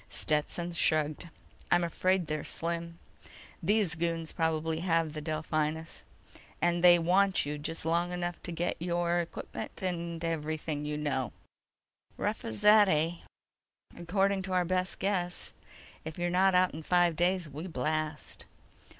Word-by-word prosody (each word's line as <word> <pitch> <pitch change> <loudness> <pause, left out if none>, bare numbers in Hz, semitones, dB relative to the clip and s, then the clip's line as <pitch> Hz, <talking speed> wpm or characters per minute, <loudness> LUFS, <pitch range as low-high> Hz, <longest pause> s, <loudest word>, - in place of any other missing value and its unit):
Stetson 160 +3 -1
shrugged. 155 0 +1 0.4
"I'm 175 0 +4
afraid 185 +2 +1
they're 155 -1 -3
slim. 170 0 -4 0.6
These 200 -1 +2
goons 165 0 -2
probably 160 -1 0
have 165 -3 +1
the 155 - -5
Delphinus, 155 +1 -2 0.5
and 175 0 +1
they 175 -1 +9
want 185 +2 +3
you 150 +1 -4
just 160 +2 -4
long 170 +2 +1
enough 175 -1 -3
to 175 - -6
get 170 +1 -2
your 175 0 +1
equipment 170 +2 -6
and 170 -2 -3
everything 155 -2 -2
you 150 0 -2
know." 135 -6 -2 0.8
"Rough - - -2
as 110 -1 -5
that, 210 -1 +7
eh?" 165 +1 +1 0.8
"According 195 +3 +1
to 190 0 -4
our 180 -1 +2
best 185 +1 0
guess. 180 -3 -2 0.5
If 160 0 -7
you're 175 0 -1
not 190 +1 +4
out 180 0 +4
in 160 - -6
five 175 0 +3
days, 180 +1 +1
we 150 +5 -7
blast." 155 0 -3
170 Hz, 140 wpm, -30 LUFS, 155-180 Hz, 0.8 s, they